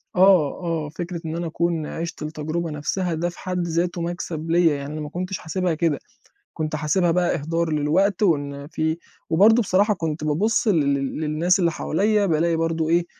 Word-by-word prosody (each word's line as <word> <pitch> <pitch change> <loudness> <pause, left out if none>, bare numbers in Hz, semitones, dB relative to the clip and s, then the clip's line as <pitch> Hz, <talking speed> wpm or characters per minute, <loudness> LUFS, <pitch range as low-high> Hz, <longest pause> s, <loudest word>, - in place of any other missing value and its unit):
آه، 180 -6 +5
آه 165 -3 -2
فكرة 170 +2 -5
إن 160 0 -3
أنا 170 0 -3
أكون 165 -1 -1
عِشت 165 +2 -5
التجربة 155 +2 -3
نفسها 170 +4 -2
ده 170 +2 -1
في 175 - -13
حد 180 -2 -2
ذاتُه 170 +1 -1
مكسب 165 -2 -4
ليّا 165 -3 +4
يعني 140 +1 -6
أنا 155 - -4
ما 150 - -5
كنتش 180 +3 -4
حاسبها 180 +1 -1
كده، 155 -2 0 0.6
كنت 155 -1 -2
حاسبها 160 +4 +1
بقى 175 +1 +2
إهدار 165 +2 -1
للوقت 175 +7 +1
وإن 145 -6 0
في 160 +1 -1 0.3
وبرضه 215 +8 +5
بصراحة 205 +2 +2
كنت 160 -4 -3
بابُصّ 210 +10 +1
لل 150 -8 +3
لل 135 +2 -3
للناس 160 +4 +2
اللي 170 -3 +2
حواليّا 205 +6 +1
بالاقي 165 0 +2
برضه 165 -1 0
إيه 170 +1 +2
165 Hz, 180 wpm, -23 LUFS, 155-180 Hz, 0.6 s, آه